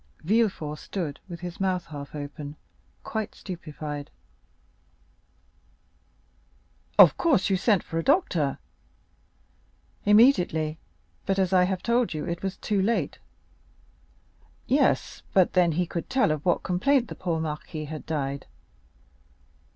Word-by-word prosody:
Villefort 185 -6 +1
stood 165 -7 -4
with 170 -1 -7
his 175 -1 -7
mouth 185 -2 0
half 145 -1 -8
open, 145 0 -7 0.5
quite 220 -2 -4
stupefied. 150 -5 -7 2.9
"Of - - +9
course 275 - +2
you - - +4
sent 195 0 +2
for 165 - -3
a - - -2
doctor?" 185 - +2 1.5
"Immediately; 180 - +4 0.5
but, 195 0 +1
as 190 -1 +1
I 180 -1 +5
have 185 -1 -2
told 235 -6 +1
you, 150 - -3
it 170 -1 -4
was 195 -1 -3
too 205 -2 0
late." 225 +5 0 1.5
"Yes; 275 +3 +1
but 185 -2 +4
then 175 -3 +4
he 180 +3 +1
could 170 0 -5
tell 260 -10 +3
of 150 -1 -2
what 175 - +1
complaint 240 +8 +2
the - - -6
poor 170 -3 -2
marquis 155 0 -4
had 155 0 -8
died." 140 -3 -3
180 Hz, 125 wpm, -26 LUFS, 155-200 Hz, 2.9 s, Of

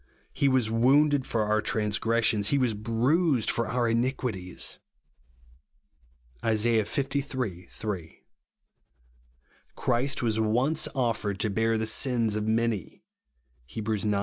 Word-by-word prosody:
He 140 - +1
was 130 -4 +2
wounded 135 +4 +3
for 110 -2 0
our 105 0 +1
transgressions, 110 0 +1
he 140 - +2
was 125 -4 +1
bruised 120 - +1
for 115 -1 -1
our 120 +1 0
iniquities," 115 -6 -2 1.6
(Is. 110 0 +1
liii. 115 -2 +3 0.9
3). 95 -7 -6 1.6
"Christ 130 +3 0
w^as 110 -2 0
once 125 +8 +1
offered 115 -6 -1
to 110 - 0
bear 115 +2 +1
the 110 - -1
sins 115 -1 +1
of 105 0 -2
many," 110 -3 -1 0.7
(Heb. 110 -2 -6
ix. 105 -2 0
115 Hz, 115 wpm, -27 LUFS, 110-125 Hz, 1.6 s, wounded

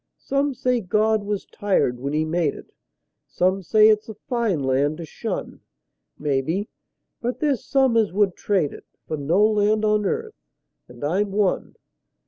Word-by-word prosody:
Some 275 0 -1
say 250 -1 0
God 215 +2 +1
was 205 -1 -3
tired 185 -12 0
when 140 +2 -3
He 155 +1 0
made 160 -2 0
it; - - -13 0.6
Some 185 +2 +1
say 215 +4 +5
it's 215 0 +2
a 220 - -7
fine 215 - -1
land 140 +3 +1
to 170 - -6
shun; - - -5 0.6
Maybe; 150 +8 -1 0.5
but 245 +1 -3
there's 285 -5 0
some 265 -3 +2
as 220 -3 +3
would 195 -1 +1
trade 185 -8 0
it - - -13 0.2
For 155 - -2
no 165 +8 +2
land 215 0 +2
on 210 -1 +2
earth 445 -1 -3 0.5
and - - -12
I'm 195 +7 0
one. 200 -2 0
205 Hz, 160 wpm, -23 LUFS, 160-220 Hz, 0.6 s, say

